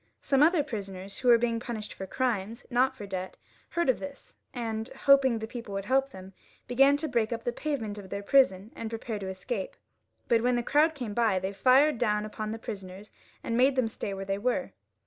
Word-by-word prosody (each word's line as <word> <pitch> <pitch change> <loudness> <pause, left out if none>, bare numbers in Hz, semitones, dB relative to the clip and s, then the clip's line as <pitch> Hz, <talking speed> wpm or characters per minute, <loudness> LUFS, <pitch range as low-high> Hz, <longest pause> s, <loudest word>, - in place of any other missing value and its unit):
Some 275 0 +2
other 320 0 +5
prisoners 195 -6 -6
who 255 - -2
were 240 -1 +8
being 230 -1 0
punished 230 -3 -6
for 190 - -7
crimes, 230 -1 -2
not 255 +2 +2
for 205 - -8
debt, 190 -1 -5 0.3
heard 340 -2 0
of 260 - +2
this, 285 -1 -9 0.2
and 225 -3 -3
hoping 270 -2 +4
the 220 - -4
people 225 -3 -7
would 195 0 -3
help 270 +3 +2
them, 190 -5 -11 0.3
began 275 +3 +5
to 315 +2 -3
break 230 -5 0
up 230 -1 -3
the 240 - 0
pavement 235 -7 -3
of 190 -2 -11
their 200 +2 -4
prison 205 -4 +3
and 225 - -5
prepare 225 -1 -4
to 190 -1 -5
escape; 190 +2 -4 0.5
but 230 -1 +3
when 250 +1 +2
the 240 - 0
crowd 305 +5 +3
came 245 -7 -5
by 220 -4 +2
they 190 +2 -2
fired. 260 +6 +4
down 210 -3 +1
upon 215 0 -5
the 225 - -4
prisoners 195 -2 -8 0.3
and 230 - -2
made 260 +3 +4
them 255 -3 +2
stay 215 -2 -5
where 195 0 -5
they 195 +1 -2
were. 250 +5 -1
230 Hz, 215 wpm, -28 LUFS, 200-260 Hz, 0.5 s, were